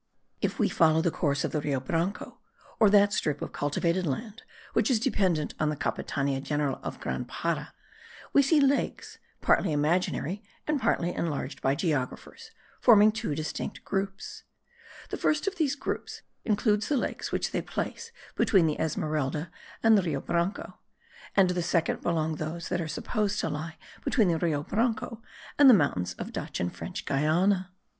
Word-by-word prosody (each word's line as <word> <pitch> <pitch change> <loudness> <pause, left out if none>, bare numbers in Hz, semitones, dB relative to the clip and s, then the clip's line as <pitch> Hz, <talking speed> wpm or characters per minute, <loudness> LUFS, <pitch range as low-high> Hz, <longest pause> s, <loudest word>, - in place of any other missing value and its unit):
If - - -1
we - - +3
follow 160 -1 +4
the 170 - +2
course 140 -4 0
of - - -1
the 150 - -1
Rio 140 -2 0
Branco, 165 +9 -3 0.4
or 215 - +6
that 205 0 +5
strip 150 -7 0
of - - -5
cultivated 170 +5 0
land 215 - -4 0.3
which - - +2
is 245 -4 +3
dependent 185 - +1
on 155 - +2
the 150 - -1
Capitania 140 -1 -2
General 145 -1 -1
of - - -6
Grand - - -3
Para, - - -2 0.6
we 280 - +7
see 290 +3 +4
lakes, 275 0 0 0.2
partly - - +3
imaginary 170 +5 0 0.2
and 300 -3 0
partly 175 -6 +1
enlarged 145 -4 -3
by 135 +1 +2
geographers, 160 - -3 0.3
forming 215 -3 +7
two 215 -8 -3
distinct 155 +1 -5
groups. 195 0 -3 0.7
The - - -2
first 300 -1 +1
of 395 -1 -2
these 295 -4 +1
groups - - -5 0.2
includes 210 -1 +2
the 290 - +1
lakes - - -3
which - - -1
they - - -1
place 465 0 -5 0.2
between 190 -5 +4
the 155 -2 -1
Esmeralda 155 0 -1 0.3
and 225 -1 +7
the 200 - +5
Rio 160 -6 -1
Branco; 170 +3 -2 0.6
and 195 -2 +6
to - - +1
the 180 - -1
second 170 -1 0
belong 160 -2 0
those 160 +2 -4
that 175 - 0
are 165 - -3
supposed 210 +6 -1
to - - -1
lie 155 +2 -5 0.3
between 220 -8 +3
the 165 -1 +1
Rio 155 -4 0
Branco 225 +3 -1 0.4
and 285 -2 +9
the 245 - +9
mountains 90 - 0
of - - -7
Dutch - - -4
and 90 0 -2
French - - -6
Guiana. 180 +6 +2
170 Hz, 170 wpm, -28 LUFS, 150-210 Hz, 0.7 s, and